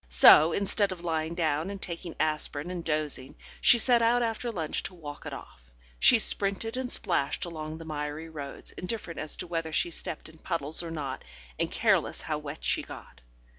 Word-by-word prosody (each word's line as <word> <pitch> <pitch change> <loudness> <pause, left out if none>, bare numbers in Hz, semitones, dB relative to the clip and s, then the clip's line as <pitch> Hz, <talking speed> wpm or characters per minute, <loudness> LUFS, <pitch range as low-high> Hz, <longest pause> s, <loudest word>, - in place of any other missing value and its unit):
So, 150 - +8
instead 200 +2 +1
of 175 -2 -7
lying 160 -1 -2
down 160 0 -1
and 200 -1 -6
taking 170 -2 -6
aspirin 155 +1 -1
and 175 -2 -5
dozing, 150 -4 -1 0.3
she 240 - +7
set 240 0 +5
out 240 +1 +3
after 230 +1 -3
lunch 165 -8 -3
to 180 +1 -6
walk 145 -4 -9
it - - -6
off. - - -12 0.3
She 245 - +6
sprinted 210 +1 +3
and 255 -1 -2
splashed 170 -7 +1
along 155 -2 -7
the 165 - -10
miry 150 +1 -5
roads, 145 -4 -8
indifferent 180 -3 -6
as 155 0 -1
to - - -4
whether 165 -2 -4
she 170 - 0
stepped 160 - -2
in 160 0 -17
puddles 160 -4 -1
or 170 - -7
not, 140 -5 -5 0.4
and - - 0
careless - - +1
how - - -3
wet - - -9
she - - +1
got. - - -12
165 Hz, 190 wpm, -28 LUFS, 155-190 Hz, 0.4 s, So